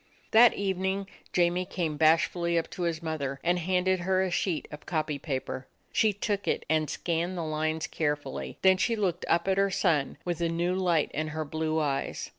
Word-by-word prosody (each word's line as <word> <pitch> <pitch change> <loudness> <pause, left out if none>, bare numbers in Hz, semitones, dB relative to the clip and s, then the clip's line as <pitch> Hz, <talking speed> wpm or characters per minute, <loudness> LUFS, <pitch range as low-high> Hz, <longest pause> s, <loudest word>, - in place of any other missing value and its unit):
That 230 +1 +7
evening 190 0 -1 0.2
Jamie 175 +1 +2
came 165 -5 -2
bashfully 165 +2 +3
up 165 - -1
to - - -6
his 170 -1 -1
mother, 140 -4 -3
and 175 +1 +2
handed 185 +1 +1
her 185 +1 +1
a 185 - -2
sheet 175 -2 -1
of 150 - -7
the - - -24
copy 155 -3 -1
paper. 130 -2 -4 0.3
She 220 -1 +4
took 205 0 -2
it - - 0
and 155 -1 +1
scanned 175 +2 -2
the 170 - -2
lines 155 0 -1
carefully; 150 -3 -3
then 190 0 +6
she 230 +4 +1
looked 185 -5 -1
up 170 +2 +2
at 190 0 +2
her 200 0 +3
son 150 -6 +1
with 175 -1 -2
a 170 - +1
new 170 +2 0
light 175 -5 +1
in 155 +1 -1
her 155 0 -3
blue 160 +1 -1
eyes. 140 -3 -2
170 Hz, 200 wpm, -28 LUFS, 155-185 Hz, 0.3 s, That